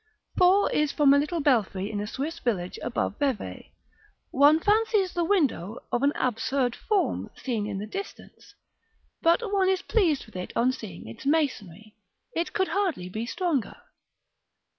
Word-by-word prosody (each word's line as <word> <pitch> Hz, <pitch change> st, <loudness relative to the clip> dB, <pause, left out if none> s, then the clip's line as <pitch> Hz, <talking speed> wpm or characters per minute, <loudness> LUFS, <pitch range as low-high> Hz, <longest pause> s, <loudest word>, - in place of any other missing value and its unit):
4 375 Hz, +3 st, +5 dB
is 300 Hz, -1 st, +1 dB
from 285 Hz, -2 st, +5 dB
a 285 Hz, -, +5 dB
little 305 Hz, +3 st, -1 dB
belfry 215 Hz, -7 st, +1 dB
in 205 Hz, -, -3 dB
a 210 Hz, -, -4 dB
Swiss 305 Hz, +9 st, -4 dB
village 185 Hz, -7 st, -2 dB
above 235 Hz, -3 st, -2 dB
Vevay; 245 Hz, -, -3 dB, 0.6 s
one 290 Hz, +3 st, +5 dB
fancies 420 Hz, -1 st, +2 dB
the 345 Hz, -, 0 dB
window 280 Hz, -, 0 dB
of 245 Hz, -, 0 dB
an 280 Hz, +1 st, +3 dB
absurd 250 Hz, +1 st, 0 dB
form, 415 Hz, -3 st, -1 dB
seen 225 Hz, -6 st, -3 dB
in 205 Hz, -2 st, -4 dB
the 200 Hz, -, -4 dB
distance, 390 Hz, -, -9 dB, 0.7 s
but 335 Hz, +8 st, +3 dB
one 380 Hz, -2 st, +3 dB
is 380 Hz, -1 st, 0 dB
pleased 340 Hz, -, +1 dB
with 220 Hz, -, -19 dB
it 180 Hz, 0 st, -5 dB
on 245 Hz, +2 st, +3 dB
seeing 205 Hz, -, -9 dB
its 115 Hz, -, -8 dB
masonry. 215 Hz, -, -1 dB, 0.4 s
It 335 Hz, -, -1 dB
could 380 Hz, -4 st, 0 dB
hardly 335 Hz, -, -1 dB
be 220 Hz, +5 st, -4 dB
stronger. 285 Hz, -, -1 dB
280 Hz, 160 wpm, -26 LUFS, 215-345 Hz, 0.7 s, 4